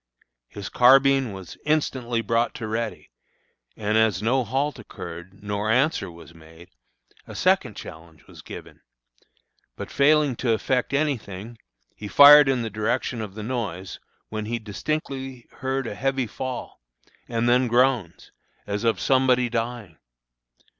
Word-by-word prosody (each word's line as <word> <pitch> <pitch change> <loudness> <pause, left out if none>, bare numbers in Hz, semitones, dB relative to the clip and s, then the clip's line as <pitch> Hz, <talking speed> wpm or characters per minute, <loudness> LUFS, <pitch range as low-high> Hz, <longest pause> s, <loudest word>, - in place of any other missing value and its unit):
His 100 +5 -8
carbine 135 0 +5
was 95 -2 -10
instantly 130 -6 0
brought 115 +1 0
to - - -7
a - - -3
ready, 110 +1 -4 0.7
and 105 +1 +1
as 110 -5 +2
no 125 +5 +1
halt 135 +5 -2
occurred 95 -2 -10
nor 105 +1 -2
answer 130 - +1
was 85 -1 -14
made, 80 +2 -16 0.6
a - - -9
second - - +1
challenge 80 -1 -12
was - - -14
given; - - -11 0.9
but - - -8
failing 145 -1 +3
to 120 -3 +1
effect 125 +4 -1
any 145 -1 +1
thing, 105 +3 -10 0.4
he 105 - -8
fired 145 +4 +9
in 130 -3 +1
the 110 - -4
direction 115 +3 -2
of 105 -3 -7
the 110 - -6
noise, 105 -7 -4 0.3
when 110 -1 -4
he 120 +1 -1
distinctly 130 +3 -5
heard 130 0 -2
a 115 - -4
heavy 135 +3 -1
fall, 125 - -6 0.5
and 115 0 -1
then 125 +1 +3
groans, 120 -7 +1 0.3
as 105 +2 -3
of 115 -5 +1
somebody 130 -1 +3
dying. 115 -7 -4
115 Hz, 145 wpm, -24 LUFS, 105-130 Hz, 0.9 s, fired